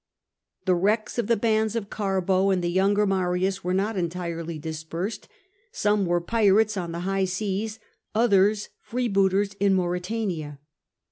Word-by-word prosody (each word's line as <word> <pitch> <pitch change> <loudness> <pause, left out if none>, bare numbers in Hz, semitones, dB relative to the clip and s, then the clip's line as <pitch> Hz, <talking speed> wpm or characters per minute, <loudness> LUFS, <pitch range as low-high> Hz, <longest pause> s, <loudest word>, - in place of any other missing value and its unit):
The 185 - +4
wrecks 210 +6 0
of 230 - 0
the 230 -1 +3
bands 220 0 +1
of 220 -3 -2
Oarbo 195 -1 +1
and 185 -2 +1
the 175 - 0
younger 200 +3 +3
Marius 190 0 0
were 180 - -1
not 205 +3 0
entirely 170 -2 -3
dispersed: 160 +6 -5 0.4
some 205 - +1
were 175 0 +2
pirates 215 +2 +3
on 175 -3 -3
the 170 +1 -4
high 195 +1 0
seas, 205 +3 -2 0.4
others 210 -2 +3
freebooters 200 -4 +1
in 200 -1 +3
Mauretania. 180 -4 -2
195 Hz, 140 wpm, -25 LUFS, 180-210 Hz, 0.4 s, The